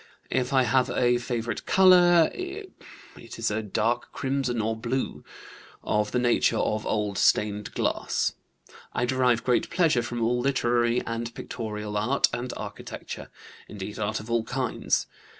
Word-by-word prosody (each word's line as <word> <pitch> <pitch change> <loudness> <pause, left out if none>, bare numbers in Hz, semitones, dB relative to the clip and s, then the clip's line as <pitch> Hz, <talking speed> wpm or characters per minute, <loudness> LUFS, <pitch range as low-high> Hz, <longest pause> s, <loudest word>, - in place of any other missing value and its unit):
If 130 -1 0
I 130 -1 +4
have 125 +2 +2
a 120 0 +2
favorite 120 -1 -3
color, 175 -3 +6
it 375 +2 -6 0.7
is 115 -2 -1
a 110 +1 -1
dark 110 +3 -1
crimson 135 -3 -1
or 110 +1 0
blue, 120 +4 -3 0.6
of 105 0 0
the - - 0
nature 120 -1 +2
of 110 0 -1
old 105 -2 -1
stained 105 0 +1
glass. - - 0 0.6
I 120 - 0
derive 125 -2 +2
great 125 -2 +1
pleasure 165 -8 +2
from 120 0 -4
all 120 +2 +1
literary 120 -2 +1
and 115 0 -3
pictorial 105 -3 -5
art 125 +7 +2
and 125 +1 -3
architecture; - - -7 0.4
indeed, 105 +2 -7
art 110 +1 -1
of 110 +2 -8
all 115 -1 +2
kinds. 125 +1 -1
120 Hz, 145 wpm, -26 LUFS, 110-130 Hz, 0.7 s, color